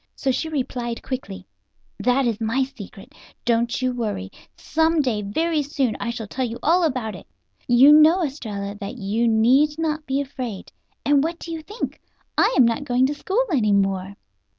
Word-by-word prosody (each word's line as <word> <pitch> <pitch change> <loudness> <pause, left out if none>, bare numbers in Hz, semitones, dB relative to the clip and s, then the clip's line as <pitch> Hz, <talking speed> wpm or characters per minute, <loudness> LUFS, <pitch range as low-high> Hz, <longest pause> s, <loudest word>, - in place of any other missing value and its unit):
So 270 - 0
she 320 +5 -2
replied 245 -5 -3
quickly: 200 -8 -6 0.5
"That 250 +5 +2
is 230 -2 -1
my 230 +4 +1
secret. 205 -7 -10
But - - -22 0.3
don't 235 +1 +1
you 255 0 +1
worry. 210 - -3 0.3
Some 320 +1 +1
day, 245 -7 0
very 310 +10 0
soon, 275 -5 -1
I 235 - -3
shall 235 -2 -4
tell 260 +5 -3
you 235 -1 -3
all 345 +4 +3
about 255 -8 -1
it. - - -12 0.4
You 255 +4 +7
know, 315 +4 +6
Estralla, 210 -9 -4
that 205 +4 -6
you 220 +2 0
need 255 +7 +3
not 310 -1 -2
be 270 +1 0
afraid. 255 -7 -5 0.3
And 285 -1 +4
what 330 +2 -2
do 335 - -8
you 325 -1 -4
think! 420 +8 -6 0.3
I - - +4
am 255 - +7
not 230 +4 0
going 255 -2 +2
to 280 - 0
school 385 +11 0
any 215 -9 +2
more." 195 0 0
255 Hz, 185 wpm, -23 LUFS, 220-295 Hz, 0.5 s, You